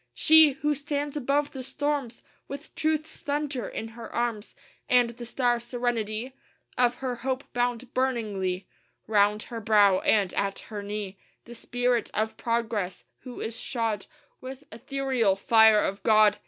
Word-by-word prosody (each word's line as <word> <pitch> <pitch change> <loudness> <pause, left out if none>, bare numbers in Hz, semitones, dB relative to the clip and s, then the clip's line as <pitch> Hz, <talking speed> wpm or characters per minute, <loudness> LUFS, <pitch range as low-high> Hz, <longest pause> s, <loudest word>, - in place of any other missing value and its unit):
She! 315 - +7
who 295 +2 0
stands 290 0 -3
above 285 +1 0
the 265 - -6
storms 280 -2 -3 0.2
With 280 +2 -8
truth's 315 0 -1
thunder 285 -5 -2
in 225 - -5
her 230 0 -10
arms, 235 -3 -2 0.3
And 245 -1 +4
the 240 0 -9
star 240 -1 +1
serenity 240 0 -2 0.4
Of 245 -1 +3
her 250 -1 -4
hope 260 +2 -2
bound 245 0 -1
burningly 210 -8 -1 0.4
Round 210 0 +2
her 230 -2 -7
brow; 205 -3 +5
and 200 -4 +2
at 200 -1 -1 0.2
her 205 - -3
knee 200 -1 -5 0.3
The 240 - -10
Spirit 245 0 -1
of 220 +1 0
Progress 225 -5 -2
who 250 -2 -9
is 225 - -4
shod 225 -5 -2 0.3
With 260 +2 -8
ethereal 250 -3 0
fire 220 +1 +5
of 195 +1 -2
God.... 215 -2 +5
240 Hz, 145 wpm, -27 LUFS, 215-265 Hz, 0.4 s, She